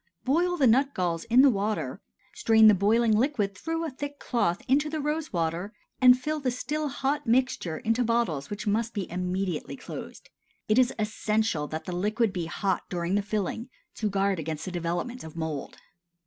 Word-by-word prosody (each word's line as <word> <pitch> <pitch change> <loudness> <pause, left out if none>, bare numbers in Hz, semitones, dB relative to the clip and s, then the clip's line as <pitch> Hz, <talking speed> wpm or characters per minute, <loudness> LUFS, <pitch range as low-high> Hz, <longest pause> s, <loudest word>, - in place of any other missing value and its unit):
Boil 350 +7 +2
the 280 - +3
nut 270 +4 +3
galls 170 -2 -1
in 245 +3 +5
the 280 - +7
water, 210 0 -2 0.3
strain 220 -1 +5
the 215 - +8
boiling 215 +3 +3
liquid 215 -5 0
through 325 - -3
a 315 - -4
thick 285 +2 -6
cloth 195 -11 -1
into 285 +4 +2
the 310 0 -3
rose 300 +2 -2
water, 170 +4 -2 0.3
and 250 0 +7
fill 305 +4 -2
the 270 -3 0
still 295 +5 -2
hot 275 +1 -2
mixture 230 -9 +1
into 225 +6 0
bottles 225 - 0
which 205 0 -5
must 225 +3 0
be 200 -3 -2
immediately 180 - -2
closed. 255 - -9 0.4
(It 215 +3 +4
is 255 -1 +4
essential 215 -6 0
that 155 +1 -5
the 180 - -4
liquid 210 +3 0
be 175 -4 -3
hot 190 +1 -1
during 175 0 -2
the 205 - +3
filling, 210 +3 -3 0.3
to 215 - 0
guard 195 -2 +1
against 155 0 -4
the 185 - -5
development 175 +8 -3
of 160 0 -10
mould.) 160 -4 -4
215 Hz, 185 wpm, -27 LUFS, 180-255 Hz, 0.4 s, the